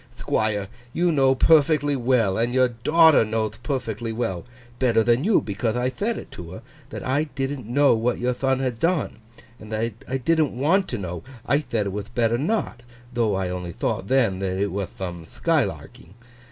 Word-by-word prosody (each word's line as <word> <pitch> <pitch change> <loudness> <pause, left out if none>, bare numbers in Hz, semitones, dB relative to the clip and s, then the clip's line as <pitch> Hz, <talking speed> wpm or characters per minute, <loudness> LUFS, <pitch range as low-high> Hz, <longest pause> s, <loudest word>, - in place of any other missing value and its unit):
'Thquire, 105 -2 -1 0.3
you 175 0 +2
know 135 -3 +3
perfectly 145 0 +4
well, 120 -6 +2
and 120 +4 0
your 130 -1 +4
daughter 155 +6 +5
knowth 110 +1 -2
perfectly 120 -3 -3
well 110 -6 -3 0.4
(better 115 -3 +3
than 120 +4 +2
you, 210 +2 +4
becauthe 110 +2 -2
I 125 +1 0
thed 220 - -2
it - - -9
to 85 0 -9
her), - - -10 0.3
that - - -7
I 140 +4 +1
didn't 135 -3 -4
know 140 +3 +4
what 115 +2 0
your 125 +1 0
thon 135 +1 0
had 125 -4 -2
done, 165 -8 0 0.4
and 110 0 -11
that 110 +1 -1
I 130 - -1
didn't 155 0 +1
want 180 +8 +2
to 120 - -3
know—I 110 - -3
thed 115 -8 -2
it - - -1
wath 100 +1 -6
better 120 0 +2
not, 160 - -1 0.3
though 115 -4 +1
I 95 -1 -1
only 90 -1 -5
thought, 95 - -2
then, 115 -8 +2
it 95 +1 -1
wath 100 -1 -4
thome 90 -3 -5
thkylarking. 95 - -2
120 Hz, 180 wpm, -24 LUFS, 105-135 Hz, 0.4 s, daughter